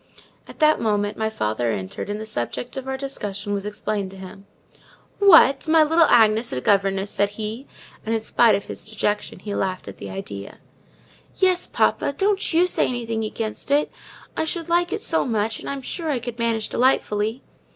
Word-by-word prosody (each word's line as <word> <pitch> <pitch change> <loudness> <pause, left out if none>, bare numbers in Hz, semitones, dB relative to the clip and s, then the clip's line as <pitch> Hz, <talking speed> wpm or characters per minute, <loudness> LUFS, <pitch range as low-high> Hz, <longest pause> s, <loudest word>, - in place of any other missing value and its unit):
At - - -12
that 310 -1 +4
moment 205 -1 0
my 220 0 -1
father 115 - -1
entered 95 - -5
and 205 +1 -3
the 220 - -6
subject 215 - -4
of 265 -1 -5
our 265 0 -2
discussion 205 -7 -4
was 200 0 -3
explained 210 -1 -3
to 190 - -12
him. 195 +1 -11 0.7
"What, 330 -8 +6
my 320 0 +6
little 325 +2 +4
Agnes 225 0 +4
a 130 - -2
governess!" 195 +4 +1
cried 200 +1 +3
he, 220 +5 -6 0.4
and, 225 +1 -1
in 220 - -1
spite 220 0 +4
of 200 - -4
his - - -6
dejection, 210 -1 -2
he 200 +2 -6
laughed 185 - -2
at 100 - -8
the 100 - -7
idea. 100 +1 -7 0.8
"Yes, 370 -2 +2
papa, 280 - +1
don't 400 0 +1
you 340 +2 +4
say 360 - +1
anything 230 -3 -3
against 215 +2 -4
it: 290 +1 +2 0.4
I - - 0
should 330 +1 -3
like 345 +1 +2
it 420 - -3
so 325 - +1
much; 220 -2 -1
and - - -7
I - - -2
am 275 -1 -7
sure 325 +4 -4
I 280 - +1
could 240 0 -7
manage 230 -2 0
delightfully." 225 -2 +1
220 Hz, 195 wpm, -23 LUFS, 205-275 Hz, 0.8 s, What